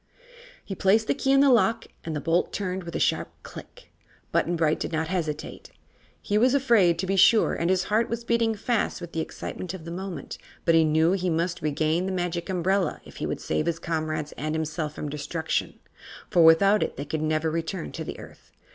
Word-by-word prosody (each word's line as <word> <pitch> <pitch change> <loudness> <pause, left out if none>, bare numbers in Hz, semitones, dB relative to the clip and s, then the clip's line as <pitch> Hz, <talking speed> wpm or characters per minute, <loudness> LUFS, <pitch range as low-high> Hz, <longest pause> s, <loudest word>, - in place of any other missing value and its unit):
He 195 - -5
placed 200 +3 +3
the - - +1
key 270 -1 0
in 275 0 +5
the 280 -1 +5
lock 230 -1 +3 0.2
and 160 -1 -4
the - - -1
bolt 165 +4 +1
turned 185 -2 -3
with 170 - -7
a - - -1
sharp - - +1
click. - - -12 0.4
Button 175 - +1
Bright 160 -2 +1
did - - -3
not 160 0 -1
hesitate. 160 -5 -4 0.5
He 205 +1 0
was 250 +4 +4
afraid, 230 -11 +4
to 190 - -2
be 195 +1 0
sure, 215 +4 +5
and 170 - -1
his 185 0 +2
heart 215 +4 +1
was 235 0 -3
beating 230 -1 +1
fast 225 0 -1
with 175 -1 -8
the 165 - -3
excitement 180 +2 -5
of 165 -4 -10
the 170 - -6
moment, 185 +1 -6 0.3
but 165 - +4
he 165 0 +6
knew 160 +2 +3
he 185 -1 0
must 170 +2 -1
regain 155 +4 0
the - - -2
Magic 175 -1 -3
Umbrella 190 +1 0
if - - -13
he - - -3
would - - -3
save 80 - -1
his 170 -1 0
comrades 155 -3 -3
and 155 +2 -4
himself 155 -1 -3
from 150 - -5
destruction, 150 +3 -3 0.5
for 170 - +5
without 195 +6 +6
it - - -2
they 140 - -4
could 155 +2 -3
never 155 +1 0
return 160 - -3
to - - -5
the - - -7
Earth. - - -14
170 Hz, 215 wpm, -26 LUFS, 160-195 Hz, 0.5 s, he